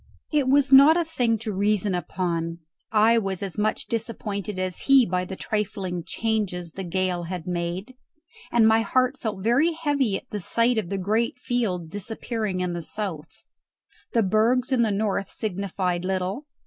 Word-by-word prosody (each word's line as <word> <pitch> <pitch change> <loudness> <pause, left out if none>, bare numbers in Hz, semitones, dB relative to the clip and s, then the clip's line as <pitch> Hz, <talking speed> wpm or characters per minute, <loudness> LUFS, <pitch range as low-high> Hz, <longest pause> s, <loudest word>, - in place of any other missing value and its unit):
It 295 -4 +2
was 280 0 +3
not 285 +5 +9
a 340 - +1
thing 245 -8 +1
to 220 -2 -3
reason 205 0 +1
upon. 170 -2 -2 0.3
I 225 +2 +5
was 195 -3 -3
as 195 +1 -4
much 215 +1 0
disappointed 210 -4 -3
as 185 -1 -2
he 270 -3 +7
by 180 -2 -1
the 190 - -6
trifling 195 -5 -3
changes 200 -7 -2
the 195 - -6
gale 180 -1 -1
had 175 -1 -5
made, 180 +5 -3 0.6
and 230 -2 +5
my 220 0 +5
heart 255 +3 +1
felt 210 -4 -4
very 275 +10 +3
heavy 285 -10 0
at - - -13
the 210 - -3
sight 230 +5 +1
of 185 -5 -5
the 195 - -2
great 220 +6 0
field 210 -10 -2
disappearing 210 -1 -3
in 180 -1 -1
the 175 - -4
south. 165 -3 -6 0.7
The 230 - +3
bergs 230 +6 +2
in 255 -2 +3
the 225 - +3
north 200 -1 -1
signified 185 -3 -2
little. 190 +9 -2
210 Hz, 170 wpm, -25 LUFS, 185-235 Hz, 0.7 s, not